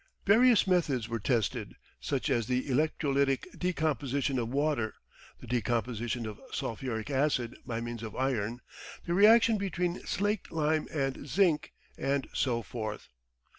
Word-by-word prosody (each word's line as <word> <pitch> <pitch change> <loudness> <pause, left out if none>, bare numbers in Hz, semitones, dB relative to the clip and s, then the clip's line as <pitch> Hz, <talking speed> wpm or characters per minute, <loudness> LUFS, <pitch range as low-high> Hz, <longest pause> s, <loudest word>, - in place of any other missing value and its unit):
Various 230 +3 +6
methods 155 - +1
were 115 0 -3
tested, 115 0 -1 0.2
such 135 - -1
as 120 -4 +1
the 125 +1 0
electrolytic 140 -1 +1
decomposition 145 -6 0
of 115 -1 -2
water, 140 -5 0 0.4
the - - -11
decomposition 120 0 -1
of 110 -1 -7
sulphuric 115 +2 -3
acid 130 -3 +1
by 115 -1 -2
means 120 -1 -5
of 110 -3 -7
iron, 125 -3 -1 0.4
the 170 - -1
reaction 220 +3 +6
between 180 -2 -1
slaked 205 +3 -2
lime 155 -1 +1
and 140 -2 -2
zinc, 165 -1 +2 0.3
and 140 0 0
so 120 -3 0
forth. 110 +1 -5
135 Hz, 130 wpm, -30 LUFS, 120-160 Hz, 0.4 s, Various